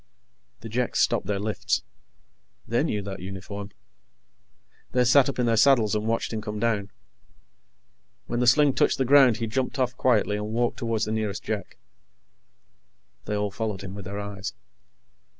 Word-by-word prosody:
The 115 - -7
Jeks 120 +2 -1
stopped - - +2
their 105 -1 0
lifts. 105 0 -1 0.8
They - - +1
knew 105 -1 -1
that 95 0 -6
uniform. 95 +2 -7 1.2
They 125 - +4
sat 130 +2 +5
up - - -5
in 125 - +1
their 115 -1 +2
saddles 115 -3 +4
and 105 +1 -1
watched 115 0 -1
him 110 - -2
come 105 -1 -5
down. 105 -3 0 1.4
When 120 - -2
the 125 - +1
sling 145 +2 +5
touched - - +2
the 130 - +1
ground, 130 -3 +6
he 115 - -2
jumped 130 +5 -2
off 125 -1 0
quietly 105 -5 +2
and 105 0 -4
walked 120 +2 -1
toward 115 -3 -1
the 105 - -2
nearest 110 -3 -2
Jek. 110 -2 -4 1.5
They 105 - -2
all 105 -1 -1
followed 105 -2 -3
him 95 -1 -7
with 100 -2 -8
their 100 +2 -5
eyes. 100 -1 -5
110 Hz, 170 wpm, -26 LUFS, 105-120 Hz, 1.5 s, ground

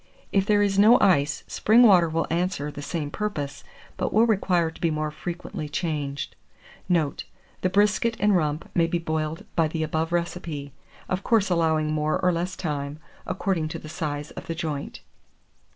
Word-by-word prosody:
If 195 0 +2
there 205 -1 +4
is 200 -1 +1
no 220 +4 +8
ice, 145 -6 +3
spring 230 +3 +4
water 180 -7 +6
will 165 +1 0
answer 170 -4 -1
the 145 - -8
same 145 0 -3
purpose, 150 -10 -4 0.3
but - - -1
will 220 +2 +5
require 180 -6 +2
to - - -16
be 170 - +2
more 155 -1 -2
frequently 170 0 -6
changed. 145 -3 -3 0.5
Note. 160 -5 +1 0.4
The 185 - +2
BRISKET 205 +4 +2
and 205 0 +3
RUMP 155 -2 0
may 170 -1 +3
be 175 - 0
boiled 155 -1 -3
by 165 -1 +3
the 160 +1 -2
above 160 +1 -1
recipe; 170 -5 -3 0.3
of 185 +1 -1
course 210 -5 +2
allowing 160 -3 +2
more 155 0 0
or 180 - +3
less 175 +2 -2
time, 145 -3 -3 0.3
according 185 -3 -1
to 165 +2 -5
the 155 - -10
size 150 -2 -4
of - - -9
the 165 - -3
joint. 155 -4 -4
165 Hz, 175 wpm, -25 LUFS, 155-185 Hz, 0.5 s, no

